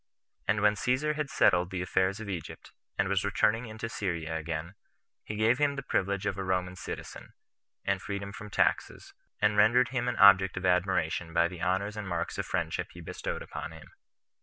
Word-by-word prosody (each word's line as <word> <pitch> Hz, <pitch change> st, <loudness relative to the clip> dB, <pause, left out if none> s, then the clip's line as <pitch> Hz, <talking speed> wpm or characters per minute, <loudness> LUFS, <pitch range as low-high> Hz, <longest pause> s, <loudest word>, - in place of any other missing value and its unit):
And 105 Hz, 0 st, +2 dB
when 105 Hz, 0 st, +5 dB
Caesar 130 Hz, +8 st, +1 dB
had 150 Hz, -2 st, -3 dB
settled 90 Hz, 0 st, +3 dB
the 90 Hz, -2 st, -3 dB
affairs 95 Hz, +3 st, +1 dB
of 110 Hz, -, -7 dB
Egypt, 90 Hz, -6 st, -6 dB, 0.3 s
and -, -, +2 dB
was 100 Hz, 0 st, +1 dB
returning 105 Hz, +3 st, +1 dB
into 110 Hz, +1 st, -5 dB
Syria 85 Hz, -7 st, -3 dB
again, 80 Hz, +2 st, -4 dB, 0.5 s
he 105 Hz, -, -5 dB
gave 110 Hz, +4 st, +3 dB
him 145 Hz, -1 st, +2 dB
the 140 Hz, -, -5 dB
privilege 100 Hz, -5 st, -1 dB
of 105 Hz, -, -1 dB
a -, -, -2 dB
Roman 90 Hz, -1 st, -1 dB
citizen, 85 Hz, -, -8 dB, 0.5 s
and 100 Hz, -2 st, 0 dB
freedom 100 Hz, 0 st, -5 dB
from 105 Hz, 0 st, -8 dB
taxes, -, -, 0 dB, 0.3 s
and 105 Hz, 0 st, +2 dB
rendered 120 Hz, +4 st, +5 dB
him 125 Hz, -2 st, -1 dB
an 125 Hz, -, 0 dB
object 95 Hz, -2 st, +7 dB
of 95 Hz, -, -3 dB
admiration 90 Hz, -2 st, +1 dB
by 85 Hz, 0 st, +4 dB
the 85 Hz, -1 st, -9 dB
honors 95 Hz, +3 st, 0 dB
and 105 Hz, -2 st, -5 dB
marks 85 Hz, -2 st, -3 dB
of -, -, -2 dB
friendship -, -, -1 dB
he -, -, -11 dB
bestowed -, -, -5 dB
upon -, -, -7 dB
him. -, -, -13 dB
100 Hz, 190 wpm, -29 LUFS, 90-110 Hz, 0.5 s, object